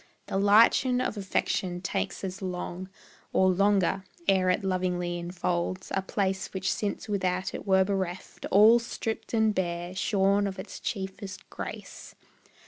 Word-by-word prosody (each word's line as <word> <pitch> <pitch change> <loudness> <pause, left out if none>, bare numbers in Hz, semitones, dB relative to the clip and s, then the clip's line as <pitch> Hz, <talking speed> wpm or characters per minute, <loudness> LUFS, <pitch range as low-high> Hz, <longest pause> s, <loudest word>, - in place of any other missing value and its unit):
The - - -2
lichen 230 +5 +5
of 255 - -1
affection 190 -2 -1
takes 195 +1 -3
as 190 0 -5
long, 185 0 -5 0.4
Or 185 0 +4
longer, 195 0 +2 0.2
ere 190 -2 +4
it 180 +3 +1
lovingly 180 -2 -1
enfolds 175 +1 -2
A 195 - +1
place 190 0 -1
which 190 0 0
since 205 +1 -3
without 185 -2 -1
it - - -7
were 190 -1 +5
bereft, 190 -2 -3
All 215 +4 +7
stript 230 -1 -4
and 220 -2 +3
bare, 175 -1 -2
shorn 200 +1 +2
of 190 - -5
its - - -8
chiefest 195 -1 -5
grace. - - -8
190 Hz, 140 wpm, -28 LUFS, 185-200 Hz, 0.4 s, All